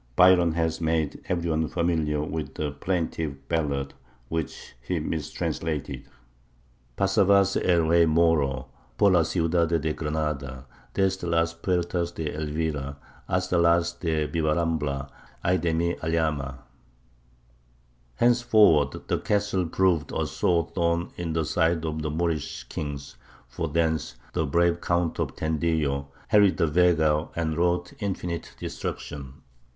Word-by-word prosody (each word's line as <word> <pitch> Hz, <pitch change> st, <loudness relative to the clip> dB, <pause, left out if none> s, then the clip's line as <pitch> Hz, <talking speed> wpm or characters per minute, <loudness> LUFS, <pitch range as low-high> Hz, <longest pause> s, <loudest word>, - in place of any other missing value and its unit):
Byron 90 Hz, -1 st, +6 dB
has 80 Hz, 0 st, -1 dB
made 80 Hz, -2 st, 0 dB
every 85 Hz, -2 st, 0 dB
one 80 Hz, 0 st, +1 dB
familiar 80 Hz, -4 st, 0 dB
with 75 Hz, -2 st, -4 dB
the 75 Hz, -1 st, -2 dB
plaintive 80 Hz, -3 st, -3 dB
ballad 70 Hz, -4 st, -1 dB, 0.4 s
which 80 Hz, -1 st, -4 dB
he 80 Hz, +8 st, -2 dB
mistranslated: 80 Hz, 0 st, -3 dB, 0.9 s
Pasavase 100 Hz, 0 st, +3 dB
el 85 Hz, -2 st, +4 dB
rey 85 Hz, +1 st, +4 dB
Moro 75 Hz, -5 st, +2 dB, 0.3 s
Por 100 Hz, -, +5 dB
la 90 Hz, -2 st, +5 dB
ciudad 85 Hz, +1 st, +1 dB
de 80 Hz, -2 st, 0 dB
Granada, 75 Hz, -5 st, -3 dB, 0.3 s
Desde 95 Hz, -2 st, 0 dB
las 85 Hz, 0 st, +2 dB
puertas 85 Hz, 0 st, -1 dB
de 80 Hz, -2 st, -3 dB
Elvira 75 Hz, -2 st, -3 dB, 0.3 s
Hasta 90 Hz, -1 st, +1 dB
las 85 Hz, 0 st, +3 dB
de 80 Hz, -3 st, 0 dB
Bivarambla. 75 Hz, -3 st, 0 dB, 0.4 s
Ay 90 Hz, +1 st, +3 dB
de 85 Hz, -, 0 dB
mi 85 Hz, +2 st, 0 dB
Alhama! 75 Hz, -5 st, -1 dB, 1.5 s
Henceforward, 110 Hz, -, +4 dB
the -, -, 0 dB
castle 100 Hz, -3 st, 0 dB
proved 85 Hz, -2 st, +1 dB
a -, -, 0 dB
sore 85 Hz, -2 st, +1 dB
thorn 85 Hz, -1 st, 0 dB
in 85 Hz, -2 st, -3 dB
the 80 Hz, -1 st, 0 dB
side 80 Hz, +1 st, +1 dB
of 80 Hz, 0 st, -3 dB
the 75 Hz, -, -2 dB
Moorish 80 Hz, -1 st, -2 dB
kings; 70 Hz, -3 st, -6 dB, 0.3 s
for 60 Hz, +7 st, -3 dB
thence 80 Hz, -3 st, 0 dB, 0.2 s
the 80 Hz, -, 0 dB
brave 85 Hz, +3 st, +2 dB
Count 85 Hz, -1 st, 0 dB
of -, -, -2 dB
Tendillo 80 Hz, -3 st, 0 dB, 0.2 s
harried 105 Hz, -3 st, +5 dB
the -, -, +3 dB
Vega 80 Hz, -1 st, +3 dB
and 80 Hz, -2 st, -1 dB
wrought 90 Hz, +1 st, 0 dB
infinite 90 Hz, -5 st, -4 dB
destruction. 70 Hz, -2 st, -6 dB
80 Hz, 125 wpm, -26 LUFS, 75-85 Hz, 1.5 s, Byron